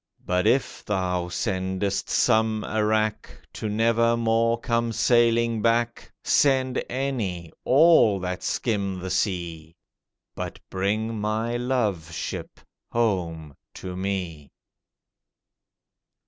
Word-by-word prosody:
But 90 Hz, 0 st, +1 dB
if 135 Hz, +1 st, +1 dB
thou 90 Hz, -3 st, -1 dB
sendest 95 Hz, +2 st, -2 dB
some 110 Hz, -2 st, +2 dB
a 110 Hz, 0 st, -1 dB
wrack, 110 Hz, 0 st, 0 dB, 0.2 s
To 110 Hz, -, -4 dB
never 115 Hz, +2 st, +2 dB
more 115 Hz, 0 st, +2 dB
come 115 Hz, 0 st, 0 dB
sailing 115 Hz, -1 st, +3 dB
back, 115 Hz, +1 st, 0 dB
Send 130 Hz, -2 st, +2 dB
any—all 120 Hz, -, +2 dB
that 90 Hz, 0 st, -3 dB
skim 100 Hz, -5 st, -1 dB
the 95 Hz, +1 st, -5 dB
sea, 85 Hz, -4 st, -2 dB, 0.6 s
But -, -, -5 dB
bring 105 Hz, +4 st, -1 dB
my 110 Hz, +3 st, -1 dB
love 110 Hz, -10 st, -1 dB
ship 80 Hz, -, -6 dB, 0.3 s
home 85 Hz, -10 st, -1 dB, 0.2 s
to 90 Hz, -1 st, -7 dB
me. 90 Hz, -6 st, -4 dB
110 Hz, 100 wpm, -25 LUFS, 95-115 Hz, 0.6 s, sailing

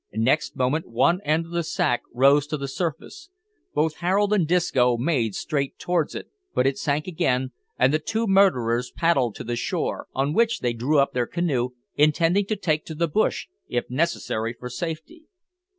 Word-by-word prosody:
Next 130 Hz, +7 st, +1 dB
moment 130 Hz, +5 st, 0 dB
one 170 Hz, +10 st, +2 dB
end 160 Hz, 0 st, +1 dB
of 165 Hz, -, -14 dB
the 170 Hz, 0 st, 0 dB
sack 125 Hz, -6 st, 0 dB
rose 140 Hz, +3 st, +4 dB
to 150 Hz, 0 st, -2 dB
the 140 Hz, -1 st, -4 dB
surface. 165 Hz, -, -5 dB, 0.5 s
Both 155 Hz, +1 st, +1 dB
Harold 195 Hz, +4 st, +1 dB
and 185 Hz, -7 st, +2 dB
Disco 130 Hz, -8 st, +2 dB
made 120 Hz, -, 0 dB
straight 140 Hz, -3 st, -2 dB
towards 175 Hz, -3 st, -1 dB
it, -, -, -6 dB, 0.3 s
but 125 Hz, -, +2 dB
it 135 Hz, 0 st, +1 dB
sank 145 Hz, +1 st, -1 dB
again, 130 Hz, -7 st, 0 dB, 0.3 s
and 130 Hz, +3 st, +3 dB
the 155 Hz, -, +2 dB
two 220 Hz, +8 st, -2 dB
murderers 125 Hz, -, +3 dB
paddled 135 Hz, -10 st, +1 dB
to -, -, -7 dB
the 120 Hz, +1 st, -3 dB
shore, 120 Hz, -, -2 dB
on 140 Hz, +3 st, 0 dB
which 230 Hz, +4 st, +2 dB
they 120 Hz, -1 st, 0 dB
drew 130 Hz, +7 st, 0 dB
up 140 Hz, 0 st, +3 dB
their 125 Hz, -1 st, 0 dB
canoe, 145 Hz, -8 st, -1 dB, 0.3 s
intending 165 Hz, +6 st, +3 dB
to 215 Hz, -, 0 dB
take 155 Hz, -6 st, -1 dB
to 160 Hz, -, -7 dB
the 170 Hz, +2 st, +1 dB
bush, 150 Hz, -, 0 dB, 0.2 s
if 120 Hz, 0 st, -3 dB
necessary, 125 Hz, -6 st, -1 dB
for 125 Hz, +1 st, -8 dB
safety. 170 Hz, -, -6 dB
150 Hz, 180 wpm, -24 LUFS, 125-170 Hz, 0.5 s, rose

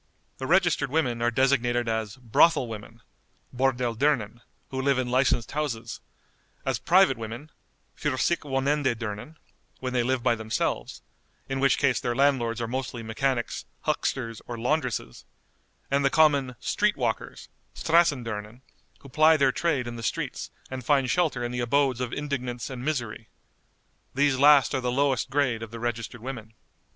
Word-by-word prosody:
The 130 Hz, -, -4 dB
registered 175 Hz, -5 st, +3 dB
women 130 Hz, -6 st, 0 dB
are 120 Hz, -, +3 dB
designated 120 Hz, -1 st, +2 dB
as 110 Hz, -1 st, -2 dB
"Brothel 130 Hz, +3 st, +3 dB
women" 115 Hz, +1 st, -9 dB, 0.5 s
(Bordell 125 Hz, -2 st, +1 dB
dirnen), 120 Hz, -4 st, 0 dB, 0.3 s
who 130 Hz, 0 st, -2 dB
live 135 Hz, -1 st, +2 dB
in 125 Hz, -1 st, -1 dB
licensed 125 Hz, -2 st, +2 dB
houses; 125 Hz, -6 st, -3 dB, 0.7 s
as -, -, 0 dB
"Private -, -, +4 dB
women" 115 Hz, +7 st, -7 dB, 0.4 s
(für 130 Hz, -3 st, -2 dB
sich 170 Hz, -, +2 dB
wohnende 135 Hz, -2 st, 0 dB
dirnen) 110 Hz, +7 st, -6 dB, 0.4 s
when 130 Hz, -1 st, -4 dB
they 125 Hz, -, +2 dB
live 125 Hz, 0 st, 0 dB
by -, -, +3 dB
themselves, 110 Hz, -1 st, -3 dB, 0.4 s
in 135 Hz, 0 st, -2 dB
which 135 Hz, 0 st, +3 dB
case 135 Hz, -3 st, +2 dB
their 120 Hz, -, -2 dB
landlords 130 Hz, -4 st, +2 dB
are 115 Hz, -, -2 dB
mostly 125 Hz, -1 st, -4 dB
mechanics, 120 Hz, +2 st, -2 dB, 0.2 s
hucksters, 115 Hz, -1 st, -2 dB
or 120 Hz, -, -5 dB
laundresses; 125 Hz, -, -2 dB, 0.7 s
and 140 Hz, 0 st, +2 dB
the 135 Hz, -, +4 dB
common 140 Hz, -3 st, +3 dB
"Street 210 Hz, 0 st, +1 dB
walkers" 120 Hz, -4 st, -3 dB, 0.3 s
(Strassen 160 Hz, -6 st, +3 dB
dirnen), 105 Hz, +2 st, -6 dB, 0.4 s
who 140 Hz, -, -13 dB
ply 155 Hz, +4 st, +5 dB
their 135 Hz, -2 st, +3 dB
trade 145 Hz, -4 st, 0 dB
in 120 Hz, 0 st, -6 dB
the -, -, -6 dB
streets, 115 Hz, -, -3 dB, 0.2 s
and 130 Hz, -1 st, -5 dB
find 135 Hz, -1 st, +2 dB
shelter 160 Hz, -9 st, +1 dB
in 120 Hz, -, -3 dB
the 125 Hz, -, -3 dB
abodes 130 Hz, +1 st, +1 dB
of 125 Hz, -2 st, -2 dB
indigence 125 Hz, -4 st, -4 dB
and 125 Hz, -1 st, -6 dB
misery. 120 Hz, -6 st, -3 dB, 0.9 s
These 140 Hz, -1 st, +2 dB
last 145 Hz, -1 st, +6 dB
are 130 Hz, -, 0 dB
the 125 Hz, 0 st, -1 dB
lowest 135 Hz, -1 st, +1 dB
grade 130 Hz, -4 st, +1 dB
of 115 Hz, -, -6 dB
the 115 Hz, +1 st, -8 dB
registered 120 Hz, -1 st, -4 dB
women. 115 Hz, -4 st, -7 dB
130 Hz, 160 wpm, -26 LUFS, 115-140 Hz, 0.9 s, last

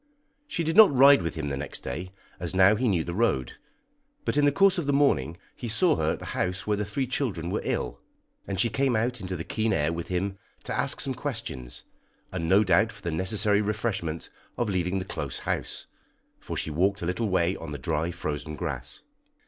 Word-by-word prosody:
She 275 Hz, -, -2 dB
did 160 Hz, 0 st, -1 dB
not 220 Hz, -4 st, +9 dB
ride 140 Hz, -1 st, +7 dB
with 85 Hz, -2 st, -3 dB
him 80 Hz, -2 st, -3 dB
next 70 Hz, 0 st, -4 dB
day, 90 Hz, +8 st, -5 dB, 0.3 s
as 90 Hz, 0 st, -3 dB
now 95 Hz, +2 st, +7 dB
he 125 Hz, +4 st, 0 dB
knew 90 Hz, -7 st, +2 dB
the 85 Hz, -, -5 dB
road, 85 Hz, -, 0 dB, 0.7 s
but -, -, 0 dB
in 145 Hz, 0 st, +4 dB
the 145 Hz, -, +5 dB
course 190 Hz, +5 st, +4 dB
of 155 Hz, -, -3 dB
the -, -, +3 dB
morning 90 Hz, -, +2 dB, 0.2 s
he 120 Hz, -, -6 dB
saw 155 Hz, +9 st, +3 dB
her -, -, +1 dB
at -, -, -5 dB
the -, -, -9 dB
house 90 Hz, +1 st, -1 dB
where 105 Hz, -, +1 dB
the 105 Hz, +1 st, -2 dB
three 120 Hz, +7 st, -2 dB
children 105 Hz, -, -2 dB
were -, -, -1 dB
ill, -, -, -2 dB, 0.5 s
and 95 Hz, -1 st, -3 dB
she 120 Hz, -, +4 dB
came 135 Hz, -3 st, +1 dB
out 120 Hz, +2 st, 0 dB
into 95 Hz, 0 st, -4 dB
the 85 Hz, -, -4 dB
keen 110 Hz, +4 st, -1 dB
air 75 Hz, -1 st, +1 dB
with 85 Hz, 0 st, -5 dB
him 95 Hz, +2 st, -2 dB, 0.2 s
to -, -, -3 dB
ask -, -, 0 dB
some 135 Hz, -, -2 dB
questions, 110 Hz, -, -5 dB, 0.5 s
and 80 Hz, 0 st, -3 dB
no 100 Hz, +3 st, +6 dB
doubt 100 Hz, +4 st, +3 dB
for 100 Hz, -2 st, -15 dB
the 85 Hz, -, -2 dB
necessary 100 Hz, +5 st, +2 dB
refreshment 100 Hz, -6 st, -2 dB, 0.3 s
of 120 Hz, -3 st, 0 dB
leaving 90 Hz, 0 st, 0 dB
the 95 Hz, -, -3 dB
close -, -, -4 dB
house, -, -, -3 dB, 0.5 s
for -, -, -6 dB
she 80 Hz, -, -2 dB
walked 95 Hz, +5 st, +1 dB
a -, -, -1 dB
little 100 Hz, +5 st, -1 dB
way 90 Hz, 0 st, +2 dB
on -, -, -7 dB
the 75 Hz, -, -4 dB
dry, 75 Hz, +5 st, -1 dB
frozen 75 Hz, -2 st, -4 dB
grass. 65 Hz, -3 st, -5 dB
95 Hz, 215 wpm, -27 LUFS, 85-120 Hz, 0.7 s, not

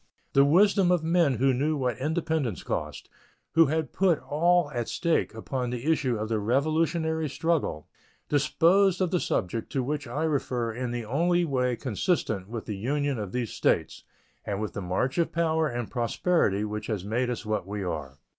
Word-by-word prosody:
The 140 Hz, -, +6 dB
wisdom 190 Hz, +5 st, +4 dB
of 175 Hz, -3 st, +2 dB
men 165 Hz, -4 st, +3 dB
who 130 Hz, +3 st, +2 dB
knew 150 Hz, +5 st, 0 dB
what 125 Hz, -4 st, -1 dB
independence 155 Hz, -, -1 dB
cost, -, -, -4 dB, 0.4 s
who 165 Hz, -1 st, +5 dB
had 155 Hz, +1 st, -1 dB
put 185 Hz, -5 st, +3 dB
all 170 Hz, +1 st, +1 dB
at 120 Hz, -4 st, -3 dB
stake 170 Hz, -10 st, 0 dB
upon 125 Hz, +2 st, -3 dB
the 125 Hz, +1 st, -5 dB
issue 130 Hz, -7 st, +1 dB
of 110 Hz, +1 st, -3 dB
the 110 Hz, -1 st, 0 dB
Revolutionary 155 Hz, -, 0 dB
struggle, 155 Hz, -, -1 dB, 0.4 s
disposed 175 Hz, +6 st, +3 dB
of 185 Hz, -2 st, 0 dB
the 180 Hz, -, +2 dB
subject 110 Hz, -, -2 dB
to 130 Hz, -, 0 dB
which 145 Hz, +1 st, -3 dB
I 145 Hz, +7 st, -2 dB
refer 125 Hz, -7 st, -1 dB
in 125 Hz, +2 st, -3 dB
the 120 Hz, -1 st, -4 dB
only 175 Hz, +8 st, +2 dB
way 125 Hz, -4 st, 0 dB
consistent 110 Hz, -, -1 dB
with 115 Hz, -1 st, -5 dB
the 105 Hz, -3 st, -4 dB
Union 140 Hz, +4 st, -1 dB
of 100 Hz, -3 st, -5 dB
these 120 Hz, -1 st, -3 dB
States -, -, 0 dB, 0.4 s
and 100 Hz, -1 st, -3 dB
with 110 Hz, -1 st, -3 dB
the 100 Hz, -, -4 dB
march 95 Hz, -, -1 dB
of 170 Hz, -, +1 dB
power 160 Hz, -1 st, +1 dB
and 120 Hz, -4 st, -4 dB
prosperity 120 Hz, -, +1 dB
which 105 Hz, 0 st, -5 dB
has 105 Hz, -5 st, -3 dB
made 120 Hz, +4 st, 0 dB
us 120 Hz, -1 st, -4 dB
what 105 Hz, -3 st, -2 dB
we 100 Hz, 0 st, -4 dB
are. 75 Hz, -6 st, -5 dB
135 Hz, 185 wpm, -27 LUFS, 110-160 Hz, 0.4 s, The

